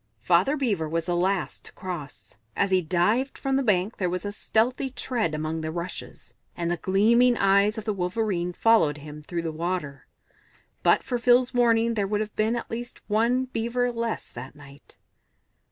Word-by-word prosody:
Father 285 +3 +3
Beaver 205 - -1
was 165 +1 -1
the 175 0 0
last 185 +2 -1
to - - -10
cross; 175 -7 -7 0.2
as 200 - +1
he 185 -1 +4
dived 185 - +1
from 270 -1 -1
the 270 - +2
bank 205 -3 +1
there 180 -2 0
was 180 +2 -3
a 205 - -2
stealthy 240 +5 0
tread 235 - -2
among 155 +1 -3
the 155 - -3
rushes, 175 +2 -7 0.2
and 170 -1 -1
the 175 - 0
gleaming 230 +7 +3
eyes 200 +2 +3
of 220 - -5
the 215 - 0
Wolverene 180 -1 -1
followed 180 -7 +3
him 150 +1 -10
through 170 +2 -4
the 165 - -2
water. 160 -4 -4 0.7
But - - +3
for 245 -2 -2
Phil's 245 +1 +4
warning 230 -1 +3
there 205 -3 0
would 210 +1 0
have 215 -1 -4
been 220 +2 +1
at 240 - -5
least 240 +1 -6
one 235 +5 +2
Beaver 245 0 -1
less 230 -1 -3
that 125 +4 -9
night. 145 -1 -16
200 Hz, 185 wpm, -26 LUFS, 170-235 Hz, 0.7 s, he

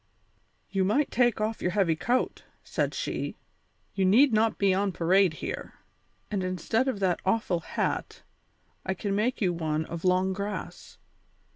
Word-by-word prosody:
"You 195 -1 +1
might 230 +10 +1
take 240 -3 +2
off 215 +1 -2
your 180 - +1
heavy 180 -4 +2
coat," 235 +10 -1 0.2
said - - -1
she; - - -3 0.6
"you 195 - 0
need 230 +8 +5
not 220 +1 +2
be 195 -1 +3
on 195 +1 +1
parade 180 +1 +3
here. - - -5 0.6
And 200 -3 -1
instead 185 +8 0
of 255 -6 -1
that 180 -3 +1
awful 190 -3 +1
hat, - - -3 0.6
I 190 - -2
can 200 +2 -2
make 230 +5 0
you 180 -3 +2
one 160 -2 -1
of 165 0 -7
long 185 +1 +2
grass. 200 +2 -6
195 Hz, 155 wpm, -28 LUFS, 180-215 Hz, 0.6 s, need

